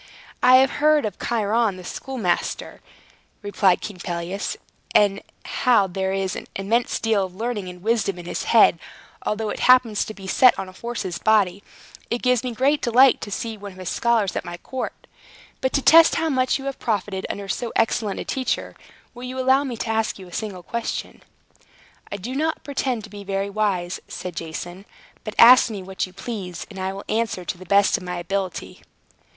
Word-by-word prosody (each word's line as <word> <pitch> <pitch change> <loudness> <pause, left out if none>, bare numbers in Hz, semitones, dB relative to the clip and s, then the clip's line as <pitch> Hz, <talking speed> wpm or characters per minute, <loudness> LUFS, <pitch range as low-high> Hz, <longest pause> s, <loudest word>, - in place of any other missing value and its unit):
"I 250 +1 +7
have 265 +1 +5
heard 305 -2 +4
of 210 - -5
Chiron 220 -2 0
the 185 - -10
schoolmaster," 220 -3 -3 0.6
replied 200 -2 +2
King 205 -3 -7
Pelias, 175 +3 -4 0.4
"and 200 -1 +4 0.2
how 240 -6 +3
that 185 - -9
there 190 0 -1
is 195 -1 -1
an - - -7
immense 225 +5 0
deal 220 -3 +1
of 185 -1 -7
learning 215 -3 -3
and 180 0 -12
wisdom 220 -4 0
in 175 - -9
his - - -4
head, - - +5 0.5
although 215 0 -1
it - - -5
happens 250 -4 +4
to 215 - -8
be 195 - -11
set 250 +6 +5
on 195 - -4
a - - -10
horse's 190 -3 -5
body. 200 -3 +2 0.5
It 235 - -2
gives 250 -1 +2
me 250 - -3
great 270 +5 +1
delight 250 +2 +5
to - - -6
see 225 0 -4
one 200 -1 -8
of - - -17
his 185 -2 -5
scholars 230 -5 +1
at - - -2
my 175 0 -7
court. 260 +7 -6 0.6
But 260 - +1
to 275 - +1
test 330 +1 +7
how 325 0 0
much 255 -3 +1
you 270 - -9
have 275 -1 -4
profited 200 -3 -2
under 200 -1 -5
so 235 +4 -3
excellent 220 -2 0
a - - -5
teacher, 260 -1 -2 0.4
will 245 0 -8
you 255 +1 -6
allow 260 +2 +3
me 250 -4 -4
to 225 - -4
ask 225 0 0
you 190 -2 -11
a 175 - -15
single 200 -4 -5
question?" 235 +3 -4 0.9
"I 200 - -3
do 225 +7 -6
not 315 +3 -1
pretend 260 -5 -2
to 210 - -11
be 205 -1 -9
very 195 0 -2
wise," 195 -4 -1
said 180 -2 -7
Jason. 175 +4 -6 0.4
"But 215 - -6
ask 245 +1 +8
me 205 -4 -6
what 190 0 -3
you - - -15
please, 195 -3 -6
and 195 - -9
I 190 0 -2
will 195 +1 -8
answer 215 -5 -1
to 180 - -4
the 185 - -12
best 200 +3 +4
of 195 - -10
my 180 0 -4
ability." 190 +1 -4
210 Hz, 200 wpm, -23 LUFS, 190-245 Hz, 0.9 s, ask